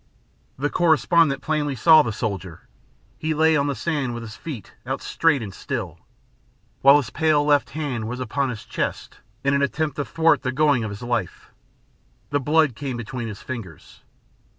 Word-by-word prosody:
The 145 +3 -1
correspondent 160 -4 +3
plainly 150 -3 -1
saw 155 +6 +7
the 120 - -2
soldier. 95 -6 -5 0.5
He 155 0 -1
lay 160 +1 +4
on 140 -1 +1
the 140 - -1
sand 145 -7 -2
with 120 - -6
his 110 -1 -9
feet 140 - -8
out - - -3
straight 150 -7 +1
and 100 -3 -7
still. 100 - -5 0.8
While 140 +1 +8
his 125 -5 -3
pale 155 -2 +2
left 145 -1 +3
hand 130 -8 -3
was 125 +2 -5
upon 130 +2 -1
his 110 -4 -7
chest - - -4 0.2
in 140 0 +2
an 140 - +2
attempt 150 +2 -1
to 145 - 0
thwart 165 0 +2
the 130 - -1
going 140 -3 +2
of 110 - -3
his 100 +3 -8
life, 120 -7 -3 0.8
the 145 - +2
blood 150 0 +3
came 135 -1 -4
between 120 +1 -5
his 105 -2 -8
fingers. 110 -11 -9
140 Hz, 175 wpm, -23 LUFS, 115-150 Hz, 0.8 s, While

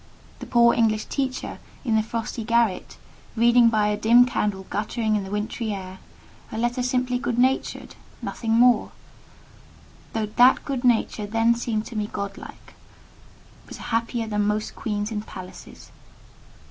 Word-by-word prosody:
The - - -8
poor 235 0 +5
English 215 -2 +1
teacher 265 -2 -3 0.3
in 225 -3 +1
the 220 - +4
frosty 225 +1 -4
garret, 230 -3 0 0.4
reading 235 +1 +5
by 215 -2 +2
a 210 - +1
dim 235 +4 +5
candle 210 -6 -2
guttering 215 +1 -1
in 205 - -1
the 190 - -8
wintry 210 +2 -3
air, 190 -1 -7 0.5
a - - -5
letter 240 +2 0
simply 250 0 0
good 245 -3 -2
natured—nothing 250 -2 -2
more; 240 +2 +4 1.2
though 220 -1 -1
that 245 +5 +4
good 270 -3 -3
nature 225 -3 +1
then 225 +2 +3
seemed 230 -2 -2
to 235 - -9
me 210 -1 -2
godlike—was 200 -1 -11
happier 230 0 -2
than 210 -1 0
most 210 +1 -2
queens 210 -1 -3
in 210 -1 -2
palaces. 185 -3 -11
225 Hz, 140 wpm, -24 LUFS, 210-240 Hz, 1.2 s, poor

